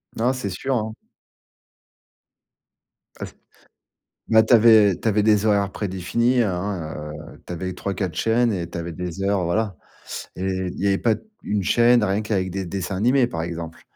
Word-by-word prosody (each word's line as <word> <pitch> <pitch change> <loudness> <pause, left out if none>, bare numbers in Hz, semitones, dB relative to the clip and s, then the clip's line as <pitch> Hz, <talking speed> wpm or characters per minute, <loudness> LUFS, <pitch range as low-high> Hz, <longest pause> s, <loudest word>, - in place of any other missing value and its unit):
Non, 120 +3 +1
c'est 130 -6 -4
sûr, 130 +9 -2
hein. 110 -2 -2 2.3
Ah - - -4
c - - -12 1.0
bah, 110 0 +6
tu 110 +2 +4
avais 110 -4 +6
tu - - -6
avais 105 0 +2
des 105 -1 +3
horaires 100 -2 +2
prédéfinis, 110 +6 0
hein, 90 -6 -3 0.2
heu, - - -19
tu - - -6
avais 90 +2 -4
3-4 95 -2 -3
chaînes 115 +5 +2
et 85 -4 -3
tu 85 - -6
avais 85 0 -5
des 90 +2 -5
heures, 100 -2 +1
voilà 95 +2 -1 0.6
et 90 - -5
il 95 -1 -3
y 100 - -1
avait 95 0 +2
pas 115 -2 +2
d - - -10 0.2
1 105 -1 -1
chaîne, 120 +3 +4
rien 100 +1 0
qu'avec 95 -3 -1
des 95 +1 -4
dessins 95 +1 -4
animés, 125 +6 +3
par 85 -9 -4
exemple. 85 -1 -6
100 Hz, 175 wpm, -22 LUFS, 90-110 Hz, 2.3 s, bah